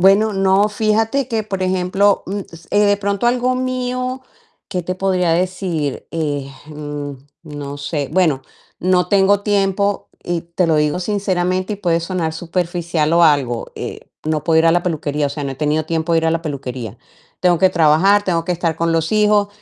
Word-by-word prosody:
Bueno, 200 +4 +5
no, 195 +1 +3
fíjate 220 +5 +1
que 225 -3 -1
por 195 -3 -5
ejemplo, 185 +2 +2
mm, 200 +2 -3 0.3
eh, 205 - +2
de 205 0 +3
pronto 200 +2 -1
algo 250 +1 +2
mío, 255 0 -2 0.5
¿qué 180 - -2
te 185 +2 -3
podría 185 -2 +1
decir?, 175 -4 -2
eh, 145 -4 -2 0.2
mm, 145 -1 -6 0.3
no 145 -2 -7
sé. 145 -1 -3
Bueno, 160 -7 +2 0.4
no 180 0 +2
tengo 200 +1 +4
tiempo 200 -1 0
y 175 -1 -2
te 170 +1 -1
lo 160 - +3
digo 150 +3 +1
sinceramente 185 -1 -1
y 205 - -3
puede 170 -4 +1
sonar 170 -2 -2
superficial 170 -1 -1
o 170 0 +5
algo, 135 -6 +1
eh, - - -7 0.2
no 155 -1 -1
puedo 165 -1 +3
ir 165 - +3
a 165 - +5
la 175 +1 +1
peluquería, 150 -3 -1
o - - -1
sea, 145 0 -5
no 140 - -3
he - - -7
tenido 150 +1 0
tiempo 165 +1 -1
de 165 - +4
ir 165 - 0
a - - +3
la 165 0 -1
peluquería. 130 - -5 0.4
Tengo 175 -2 +3
que 190 +2 +4
trabajar, 175 +5 +4
tengo 170 -3 0
que - - -4
estar 170 -1 -1
con 170 0 0
los 165 0 0
hijos 210 -1 +3
175 Hz, 190 wpm, -18 LUFS, 160-200 Hz, 0.5 s, Bueno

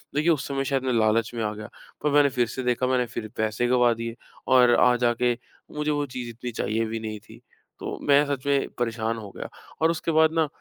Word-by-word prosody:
देखिए, 155 +3 +2
उस 150 - -1
समय, 135 -1 -1
शायद 135 -1 0
मैं 130 -1 0
लालच 110 0 +2
में 115 -2 -3
आ 105 0 -1
गया। 105 0 -9 0.3
पर 150 - +2
मैंने 145 -1 +5
फिर 120 -2 +3
से 130 +3 -5
देखा, 125 +1 +1
मैंने 125 -1 +2
फिर 110 - -3
पैसे 110 +2 0
गँवा 125 -1 +4
दिए, 115 0 -5 0.3
और 125 -2 +6
आ 125 0 +5
जा 120 0 +2
के 120 -1 +2 0.4
मुझे 150 0 -1
वो 145 0 0
चीज़ 125 -2 -6
इतनी 120 +1 -6
चाहिए 115 0 -1
भी 110 +1 -4
नहीं 110 -1 -5
थी। 115 +2 -16 0.4
तो - - -5
मैं 145 +1 +5
सच 140 -2 -3
में 140 -1 +1
परेशान 115 -1 -1
हो 105 -3 -8
गया - - -7 0.3
और 165 +1 +4
उसके 165 0 -2
बाद 160 0 +4
ना, 160 -2 +2
125 Hz, 240 wpm, -25 LUFS, 115-140 Hz, 0.4 s, और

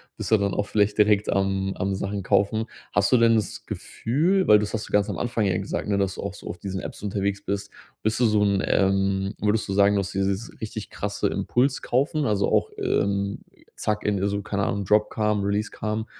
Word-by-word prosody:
bist - - -5
du 110 - +7
dann 100 -1 0
auch 105 - 0
vielleicht 105 -1 +1
direkt 105 -1 +3
am 95 0 0
am 95 +1 -1
Sachen 100 +1 -3
kaufen. 110 +4 +1 0.3
Hast 100 +3 +2
du 125 - +6
denn 115 0 +5
das 110 -2 -2
Gefühl 170 +11 0
weil 105 - +7
das 105 0 -3
hast 110 -1 -3
du - - -15
ganz 105 -1 +3
am - - -3
Anfang 120 -3 -1
ja 95 -2 +1
gesagt, 100 +2 -3
ne? 100 - +2
Dass 100 -2 0
du - - -6
auch - - -4
so - - -11
auf - - -5
diesen 95 -1 -5
Apps - - -8
unterwegs 100 -1 -1
bist, 100 0 -3 0.3
bist 110 +1 0
du - - +5
so 105 -1 +2
'n, 100 -1 +2
ähm 95 0 +1
würdest 105 +1 +1
du 95 - -2
sagen, 100 +1 +4
du 100 - +2
hast 95 0 -3
dieses 95 +3 -1
richtig 110 -2 -6
krasse - - -2
Impulskaufen? 135 +3 0
Also, 100 -4 +1
auch, - - +2
ähm, 100 0 0 0.4
zack 105 0 -2
in 105 -2 +1
äh, 100 - +1
so, 100 0 -1
keine 100 0 -2
Ahnung, 100 0 -1
Dropcam, 105 +1 +2
Releasecam, 105 +2 -2
100 Hz, 220 wpm, -25 LUFS, 100-110 Hz, 0.4 s, du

